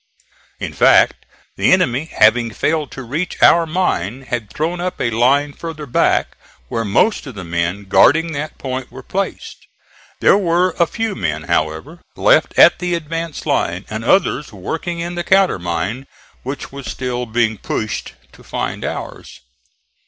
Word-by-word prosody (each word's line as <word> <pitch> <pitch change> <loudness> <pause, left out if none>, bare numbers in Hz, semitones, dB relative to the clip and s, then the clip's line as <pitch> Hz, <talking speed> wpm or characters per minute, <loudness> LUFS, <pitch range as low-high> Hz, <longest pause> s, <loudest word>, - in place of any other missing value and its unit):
In - - -5
fact, - - +4 0.3
the - - +3
enemy 130 +5 +2
having 115 -4 +3
failed 150 +6 -1
to 130 - -7
reach 150 +9 -4
our 170 -1 +6
mine 135 - -1
had 120 -5 -4
thrown 165 +3 -2
up 180 0 -3
a 115 - 0
line 140 +6 +2
farther 160 -2 -7
back, 125 - +1 0.3
where 115 - -1
most 145 - +1
of 130 - -8
the 95 - -7
men 85 +4 -2
guarding 165 +11 +4
that 150 +1 -5
point 130 -1 -5
were 130 - -10
placed. 195 +7 -5 0.5
There 200 - +5
were 180 0 +2
a 170 - +4
few 225 +2 -2
men, 80 -6 -3
however, 80 - -2
left - - +3
at - - +7
the 180 -1 -1
advance 165 0 -5
line, 90 +3 -1
and 110 +1 -4
others 150 -1 +2
working 160 - -4
in 170 +1 -4
the 175 0 -3
countermine, 115 - +1 0.3
which 135 +1 -6
was 140 -1 -8
still 125 -1 -3
being 110 -2 0
pushed 110 -2 -4 0.2
to - - -18
find - - -4
ours. - - -6
135 Hz, 155 wpm, -18 LUFS, 110-170 Hz, 0.5 s, at